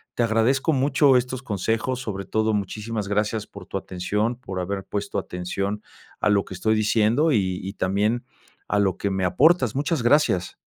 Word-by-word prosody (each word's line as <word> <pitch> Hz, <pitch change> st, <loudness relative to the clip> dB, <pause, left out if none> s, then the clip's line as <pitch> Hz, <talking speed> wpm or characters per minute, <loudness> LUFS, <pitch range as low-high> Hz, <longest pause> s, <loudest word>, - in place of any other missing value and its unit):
te 120 Hz, -, +1 dB
agradezco 120 Hz, +7 st, +2 dB
mucho 140 Hz, 0 st, +4 dB
estos 125 Hz, +1 st, 0 dB
consejos, 115 Hz, +4 st, -1 dB
sobre 100 Hz, -6 st, -5 dB
todo 110 Hz, +3 st, 0 dB
muchísimas 105 Hz, +1 st, -3 dB
gracias 105 Hz, +1 st, -1 dB
por -, -, -12 dB
tu -, -, -3 dB
atención, 105 Hz, +6 st, -2 dB
por 95 Hz, -7 st, -6 dB
haber 95 Hz, +1 st, -3 dB
puesto 100 Hz, -1 st, -3 dB
atención 100 Hz, +3 st, -4 dB, 0.4 s
a -, -, +2 dB
lo 100 Hz, -1 st, +3 dB
que 95 Hz, -, -9 dB
estoy 110 Hz, +5 st, +1 dB
diciendo, 110 Hz, +8 st, +2 dB
y 95 Hz, -7 st, +1 dB
y 95 Hz, +2 st, -5 dB
también 105 Hz, +6 st, 0 dB, 0.4 s
a 105 Hz, -, +1 dB
lo 95 Hz, -3 st, +1 dB
que 100 Hz, -, -2 dB
me 95 Hz, -1 st, -1 dB
aportas, 130 Hz, -, +3 dB
muchas 145 Hz, +1 st, 0 dB
gracias. 120 Hz, -8 st, +2 dB
105 Hz, 175 wpm, -24 LUFS, 100-125 Hz, 0.4 s, mucho